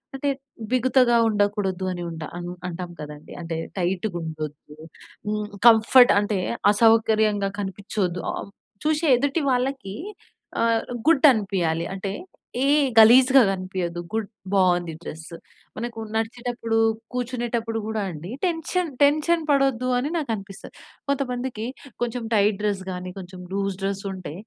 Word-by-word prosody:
అంటే, 280 +1 -1 0.4
బిగుతగా 255 -1 +4
ఉండకూడదు 205 -3 0
అని 175 -1 -4
ఉంటా 160 -1 -6 0.4
అంటాం 175 0 -6
కదండీ! 150 0 -9
అంటే 165 -1 -4 0.2
టైట్‌గా 180 +1 -1
ఉండొద్దు. 155 -2 -7 0.5
హ్మ్. 210 0 -1 0.2
కంఫర్ట్ 235 +3 +7
అంటే 205 -1 -1 0.3
అసౌకర్యంగా 220 -2 +3
కనిపించొద్దు. 190 -2 -3
ఆహ్, 200 - -6 0.3
చూశే 310 +1 +1
ఎదుటి 285 +4 0
వాళ్ళకి 255 -5 -1 0.7
ఆహ్, 230 -1 +3 0.3
గుడ్ 305 -2 +6
అనిపియాలి. 180 -6 -1
అంటే 195 0 -4 0.5
ఏ - - +3 0.3
గలీజుగా 255 +4 +8
కనిపియద్దు 185 -2 -3
గుడ్ 220 -2 -2 0.3
బాగుంది 175 -3 +2
డ్రస్సు. 160 +1 -8 0.4
మనకు 230 0 -5 0.2
నడిచేటప్పుడు 230 0 -2 0.4
కూర్చునేటప్పుడు 235 -2 -2
కూడా 220 -1 -2
అండి 170 +5 -8
టెన్షన్ 345 0 0
టెన్షన్ 310 +4 +3
పడొద్దు 270 -3 +2
అని 285 +4 -2
నాకనిపిస్తది. 215 -10 -5 0.3
కొంతమందికి 250 -4 -2 0.4
కొంచెం 240 0 -2
టైట్ 210 -1 +3
డ్రెస్ 205 -2 -1
గాని, 180 0 -5
కొంచెం 185 -1 -9
లూజ్ 195 -1 -1
డ్రెస్ 195 0 -2
ఉంటే 185 -5 -7
215 Hz, 120 wpm, -24 LUFS, 185-245 Hz, 0.7 s, గలీజుగా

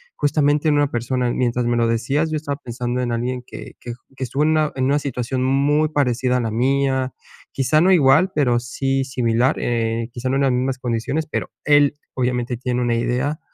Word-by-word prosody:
justamente, 145 +1 +1
en 150 - +3
una 145 -1 +2
persona. 120 +1 -1
Mientras 125 -1 0
me 120 0 +1
lo 115 -1 +2
decías, 135 +8 0
yo 155 - 0
estaba 145 -2 -4
pensando 120 +1 -3
en 120 -1 -2
alguien 125 +1 -2
que - - -10
que 120 - -7
j 120 - -18
que 130 - -5
estuvo 140 +4 -1
en 155 - +3
una 155 -1 +2
en 130 -1 0
una 140 +2 +2
situación 130 -1 -3
muy 145 +3 +2
parecida 125 -3 +1
a - - 0
la 115 -2 -2
mía. 130 +2 0 0.4
Quizá 140 +3 +2
no 185 - +4
igual, 160 +4 +4
pero 125 -5 +2
sí 135 +3 -1
similar. 125 0 +1
Eh, 115 -1 -1
quizá 125 +1 -3
no 130 - 0
en - - +1
las 135 - +3
mismas 130 +1 -1
condiciones. 125 +6 -2
Pero - - -3 0.2
él, 145 -1 +4 0.2
obviamente, 125 -1 -1
tiene 125 0 -2
una 120 -1 +1
idea 125 +6 -1
130 Hz, 210 wpm, -21 LUFS, 120-145 Hz, 0.4 s, no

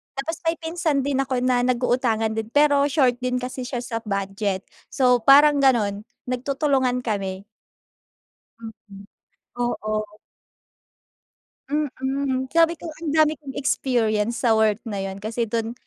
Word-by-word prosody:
Tapos, 315 +4 -4
may 330 - +2
pinsan 320 -4 -1
din 275 -1 -1
ako 260 -2 -1
na 250 -1 +2
nag-uutangan 245 -3 +1
din. 220 0 -3
Pero 285 +2 +3
short 260 -4 +2
din 250 0 -2
kasi 250 0 -4
siya 245 -2 -4
sa 230 -1 -4
budget. 195 -1 -2 0.2
So, 250 -2 +3
parang 285 +4 +6
ganun, 215 -6 +2 0.2
nagtutulungan 260 0 0
kami. 195 -3 -3 1.2
Mm. 210 -3 -12 0.6
Oo. 215 -3 -3 1.5
Mm. 265 -2 -2
Sabi 330 0 +4
ko 325 +1 -8
ang 310 0 -6
dami 310 -1 +3
kong 275 -3 -9
experience 235 -4 0
sa 235 - +4
work 215 -1 +2
na 205 -4 -5
yun. 195 0 -4
Kasi 230 +1 -2
dun, 230 +1 -2
250 Hz, 130 wpm, -23 LUFS, 220-275 Hz, 1.5 s, parang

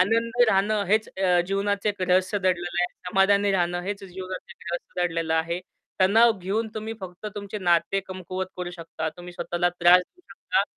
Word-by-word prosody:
आनंदी 230 +5 +3
राहणं 205 +1 +2
हेच 215 +3 +2
अ, 180 -2 +4
जीवनाचं 200 +1 0
एक 200 -2 -2
रहस्य 185 +3 +2
दडलेलं 175 -2 0
आहे. - - +2 0.2
समाधानी 200 +2 +3
राहणं 175 -1 +1
हेच 200 +1 -4
जीवनाचं 185 0 -7 0.2
रहस्य 175 +1 -3
दडलेलं 165 -1 -1
आहे. 170 +2 0 0.4
तणाव 225 +5 +6
घेऊन 205 +5 -1
तुम्ही 220 +1 -4
फक्त 185 +2 -8
तुमचे 200 0 -5
नाते 175 +1 +2
कमकुवत 185 0 -5
करू 180 -1 -4
शकता, 165 -2 -5
तुम्ही 175 0 -9
स्वतःला 175 0 0
त्रास 175 +1 +6
देऊ 360 - -25
शकता - - 0
185 Hz, 165 wpm, -25 LUFS, 175-205 Hz, 0.4 s, तणाव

